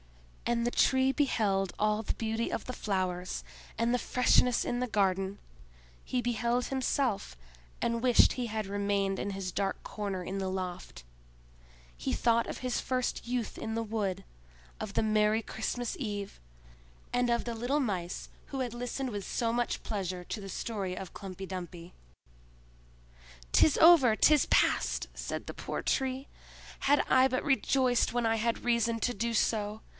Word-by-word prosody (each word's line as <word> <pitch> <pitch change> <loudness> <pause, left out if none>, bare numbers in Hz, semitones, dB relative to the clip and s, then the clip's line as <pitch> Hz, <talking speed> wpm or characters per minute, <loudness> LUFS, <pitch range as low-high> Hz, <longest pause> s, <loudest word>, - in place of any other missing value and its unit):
And 235 0 +1
the - - 0
Tree 265 +1 +3
beheld 200 - +1
all 210 0 +2
the - - -2
beauty 225 +1 -2
of - - -3
the 255 - -5
flowers, 185 - -2 0.4
and 230 +1 +1
the 250 - +2
freshness 250 -1 +3
in 245 0 -1
the 250 - 0
garden; 195 -2 +1 0.7
he 250 - -1
beheld 240 +1 0
himself, 255 - -1 0.4
and 235 0 0
wished 245 -2 +5
he 250 -2 -3
had 215 -1 -3
remained 200 -1 0
in - - -2
his 195 -2 -4
dark 195 -1 -1
corner 200 -3 -4
in 195 +2 -4
the 190 -1 -2
loft: 185 - -5 0.9
he - - -3
thought 235 0 +2
of - - -5
his 250 -1 -2
first 255 -2 -2
youth 245 -2 -2
in 220 0 -4
the 230 - -1
wood, 210 -4 -2 0.5
of - - -6
the - - +2
Merry 215 0 +3
Christmas 235 - -3
Eve, 205 - -4 0.7
and 245 0 +2
of 235 0 +1
the 235 -1 -3
little 245 +6 0
Mice 190 -9 -2 0.2
who 270 - -5
had 245 -3 -2
listened 245 +2 -3
with 205 -3 -4
so 230 -1 -1
much 240 0 -1
pleasure 185 -4 -3
to 210 - -5
the 195 - -7
story 195 -4 -3
of 190 - -6
Humpy 195 -1 -7
Dumpy. 180 -2 -7 1.6
"'Tis 305 - +5
over—'tis 300 -3 +6
past!" - - +2
said - - -5
the - - -6
poor - - -4
Tree. 265 0 -1 0.5
"Had 285 +1 +4
I 260 0 +5
but 255 0 -1
rejoiced 265 -3 +2
when 240 -1 0
I 225 0 +3
had 230 +2 -1
reason 235 -1 +2
to 245 - +1
do 235 +2 -2
so! 215 -1 0
225 Hz, 160 wpm, -30 LUFS, 195-245 Hz, 1.6 s, over—'tis